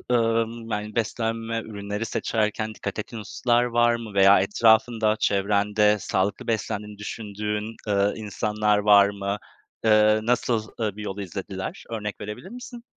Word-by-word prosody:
ımm, 115 Hz, 0 st, 0 dB
yani 105 Hz, 0 st, -3 dB
beslenme 115 Hz, 0 st, -1 dB
ürünleri 105 Hz, 0 st, -5 dB
seçerken 110 Hz, 0 st, -1 dB
dikkat 100 Hz, +1 st, -5 dB
ettiğin 110 Hz, +2 st, -6 dB
hususlar 120 Hz, +4 st, +1 dB
var 120 Hz, -1 st, +3 dB
mı 115 Hz, -3 st, -7 dB
veya 100 Hz, 0 st, +6 dB
etrafında, 110 Hz, +2 st, +3 dB
çevrende 105 Hz, +1 st, +2 dB
sağlıklı 100 Hz, +7 st, -1 dB
beslendiğini 105 Hz, -2 st, -3 dB
düşündüğün, 105 Hz, +1 st, -4 dB
eee, 100 Hz, 0 st, +2 dB
insanlar 105 Hz, 0 st, 0 dB
var 100 Hz, -1 st, +6 dB
mı? 100 Hz, 0 st, -3 dB, 0.5 s
Eee, 110 Hz, -1 st, +5 dB
nasıl, 115 Hz, -2 st, 0 dB
eee, 105 Hz, -3 st, -1 dB
bir 105 Hz, -, -7 dB
yol 100 Hz, -1 st, -5 dB
izlediler? 95 Hz, 0 st, -6 dB
Örnek 105 Hz, -3 st, -5 dB
verebilir 105 Hz, -, -7 dB
misin? 240 Hz, 0 st, -9 dB
105 Hz, 135 wpm, -25 LUFS, 105-115 Hz, 0.5 s, veya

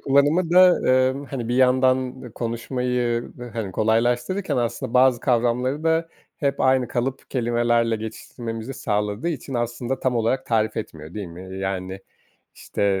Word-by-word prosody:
kullanımı 145 Hz, +5 st, +3 dB
da, 180 Hz, +1 st, +8 dB
ııı, 130 Hz, +1 st, +2 dB
hani, 120 Hz, -3 st, -5 dB
bir 120 Hz, -, 0 dB
yandan 130 Hz, -1 st, +2 dB
konuşmayı, 120 Hz, 0 st, -2 dB, 0.2 s
hani, 110 Hz, -5 st, -4 dB
kolaylaştırırken 120 Hz, -, +1 dB
aslında 120 Hz, 0 st, -2 dB
bazı 125 Hz, -1 st, +5 dB
kavramları 125 Hz, +4 st, +1 dB
da 165 Hz, 0 st, +2 dB, 0.3 s
hep 140 Hz, -1 st, -1 dB
aynı 130 Hz, -2 st, +3 dB
kalıp 125 Hz, +2 st, -3 dB
kelimelerle 120 Hz, -2 st, +1 dB
geçiştirmemizi 115 Hz, +2 st, -6 dB
sağladığı 105 Hz, +6 st, -1 dB
için 140 Hz, -4 st, -5 dB
aslında 120 Hz, +2 st, -2 dB
tam 125 Hz, -2 st, +1 dB
olarak 115 Hz, +3 st, 0 dB
tarif 110 Hz, -2 st, +1 dB
etmiyor, 80 Hz, -6 st, -7 dB
değil 105 Hz, -2 st, -4 dB
mi? 85 Hz, +1 st, -10 dB
Eee, 95 Hz, -, -6 dB
yani, 95 Hz, 0 st, -3 dB, 0.5 s
işte, 100 Hz, -1 st, -1 dB
120 Hz, 140 wpm, -23 LUFS, 115-130 Hz, 0.5 s, da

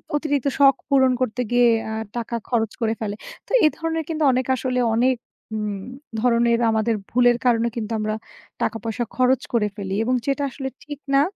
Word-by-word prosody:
অতিরিক্ত 290 Hz, -3 st, 0 dB
শখ 275 Hz, -1 st, +7 dB
পূরণ 265 Hz, -2 st, +5 dB
করতে 250 Hz, 0 st, 0 dB
গিয়ে 245 Hz, 0 st, +5 dB, 0.2 s
আ -, -, -4 dB, 0.2 s
টাকা 235 Hz, 0 st, -3 dB
খরচ 225 Hz, -3 st, +1 dB
করে 225 Hz, 0 st, +1 dB
ফেলে। 205 Hz, -1 st, -2 dB, 0.3 s
তো -, -, -15 dB
এ -, -, +8 dB
ধরনের 325 Hz, 0 st, -2 dB
কিন্তু 315 Hz, -1 st, -1 dB
অনেক 255 Hz, 0 st, 0 dB
আসলে 255 Hz, 0 st, -1 dB, 0.2 s
অনেক 255 Hz, +2 st, +3 dB, 0.4 s
উম 210 Hz, -2 st, -3 dB, 0.4 s
ধরনের 235 Hz, 0 st, +3 dB
আমাদের 220 Hz, +1 st, +1 dB
ভুলের 245 Hz, 0 st, +4 dB
কারণে 235 Hz, -1 st, +3 dB
কিন্তু 225 Hz, -1 st, -4 dB
আমরা 215 Hz, 0 st, -1 dB, 0.5 s
টাকা 225 Hz, -, 0 dB
পয়সা 230 Hz, +1 st, -2 dB
খরচ 255 Hz, 0 st, +3 dB
করে 215 Hz, -3 st, +2 dB
ফেলি 195 Hz, -2 st, -4 dB
এবং 255 Hz, +2 st, +1 dB
যেটা 280 Hz, +1 st, 0 dB
আসলে 265 Hz, +1 st, -5 dB, 0.2 s
ঠিক 290 Hz, -1 st, -8 dB
না। 275 Hz, -, +6 dB
245 Hz, 180 wpm, -22 LUFS, 225-265 Hz, 0.5 s, এ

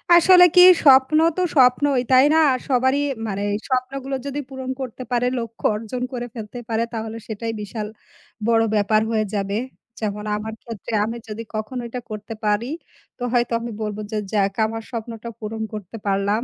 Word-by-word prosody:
আসলে 360 Hz, +1 st, +8 dB
কি 360 Hz, -, +9 dB, 0.2 s
স্বপ্ন 270 Hz, +1 st, +6 dB, 0.2 s
তো 365 Hz, -, +1 dB
স্বপ্নই 260 Hz, 0 st, +4 dB
তাই 260 Hz, +1 st, +7 dB
না? -, -, +5 dB, 0.3 s
সবারই 260 Hz, +1 st, +2 dB, 0.3 s
মানে 200 Hz, -1 st, -3 dB, 0.3 s
স্বপ্নগুলো 265 Hz, +1 st, -2 dB
যদি 280 Hz, +1 st, -3 dB
পূরণ 265 Hz, -1 st, -6 dB
করতে 255 Hz, 0 st, -6 dB
পারে 245 Hz, 0 st, +1 dB
লক্ষ্য 230 Hz, -1 st, -7 dB
অর্জন 225 Hz, +3 st, -5 dB
করে 245 Hz, -1 st, -3 dB
ফেলতে 225 Hz, +1 st, -7 dB
পারে 225 Hz, 0 st, +1 dB
তাহলে 225 Hz, 0 st, -4 dB
সেটাই 225 Hz, +1 st, -4 dB
বিশাল 210 Hz, +1 st, -5 dB, 0.6 s
বড়ো 225 Hz, -1 st, +4 dB
ব্যাপার 215 Hz, +1 st, +3 dB
হয়ে 215 Hz, -1 st, +1 dB
যাবে। 200 Hz, 0 st, -1 dB, 0.4 s
যেমন 210 Hz, -1 st, -3 dB
আমার 220 Hz, +1 st, -5 dB
ক্ষেত্রে 230 Hz, -1 st, -7 dB
আমি 230 Hz, +2 st, -4 dB
যদি 220 Hz, +1 st, -6 dB
কখনো 215 Hz, +4 st, -3 dB
এটা 250 Hz, -, -5 dB
করতে 215 Hz, +1 st, -6 dB
পারি, 210 Hz, +2 st, +1 dB, 0.5 s
তো -, -, -22 dB
হয়তো 240 Hz, -1 st, +1 dB
আমি 235 Hz, 0 st, -5 dB
বলবো 210 Hz, -1 st, -3 dB
যে 215 Hz, -, -1 dB
যাক 200 Hz, -2 st, +1 dB
আমার 225 Hz, +1 st, -4 dB
স্বপ্নটা 230 Hz, -1 st, -6 dB
পূরণ 220 Hz, 0 st, -5 dB
করতে 210 Hz, +1 st, -7 dB
পারলাম। 200 Hz, +3 st, +1 dB
230 Hz, 170 wpm, -22 LUFS, 215-255 Hz, 0.6 s, কি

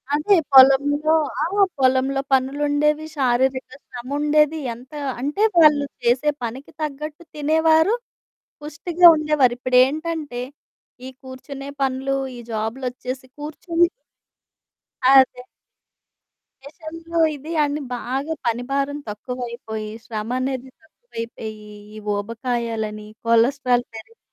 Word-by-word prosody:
అదే. 350 Hz, +7 st, +3 dB, 0.2 s
పొలంలో 285 Hz, +4 st, +6 dB, 0.3 s
ఆ! -, -, +2 dB, 0.4 s
పొలంలో 265 Hz, +1 st, +2 dB
పనులుండేవి, 290 Hz, +3 st, +1 dB
శారీరక 260 Hz, 0 st, +1 dB, 0.2 s
శ్రముండేది. 295 Hz, +5 st, 0 dB
ఎంతా 260 Hz, +6 st, -10 dB, 0.2 s
అంటే, 295 Hz, +9 st, -2 dB, 0.2 s
వాళ్ళు 295 Hz, -2 st, +6 dB, 0.2 s
చేసే 250 Hz, +5 st, +2 dB
పనికి 250 Hz, +4 st, -6 dB
తగ్గట్టు 300 Hz, +2 st, -5 dB
తినేవారు, 320 Hz, +6 st, +3 dB, 0.7 s
పుష్టిగా 330 Hz, +4 st, 0 dB
ఉండేవారు. 300 Hz, -5 st, +2 dB
ఇప్పుడేంటంటే, 270 Hz, +2 st, +1 dB, 0.7 s
ఈ -, -, -6 dB
కూర్చునే 270 Hz, +1 st, -9 dB
పనులూ, 270 Hz, +1 st, -1 dB, 0.2 s
ఈ -, -, -9 dB
జాబులొచ్చేసి 250 Hz, +3 st, -4 dB
కూర్చొని 330 Hz, +3 st, 0 dB, 1.2 s
అదే. 260 Hz, -2 st, +5 dB, 1.2 s
మిషన్లు 330 Hz, +3 st, -6 dB, 0.2 s
ఇది 300 Hz, +4 st, -9 dB
అని 290 Hz, +1 st, -2 dB
బాగా 270 Hz, +6 st, -3 dB
పని 235 Hz, +1 st, 0 dB
భారం 280 Hz, +1 st, -1 dB
తక్కువైపోయి, 230 Hz, -1 st, -6 dB, 0.2 s
శ్రమనేది 255 Hz, +4 st, -3 dB
తక్కువైపోయీ, 230 Hz, -, -9 dB, 0.3 s
ఈ -, -, -9 dB, 0.2 s
ఊబకాయాలనీ, 225 Hz, -1 st, -3 dB, 0.2 s
కొలస్ట్రార్ 245 Hz, +2 st, +3 dB
పెరిగిపోవటం, 225 Hz, -, -12 dB
270 Hz, 90 wpm, -22 LUFS, 245-300 Hz, 1.2 s, పొలంలో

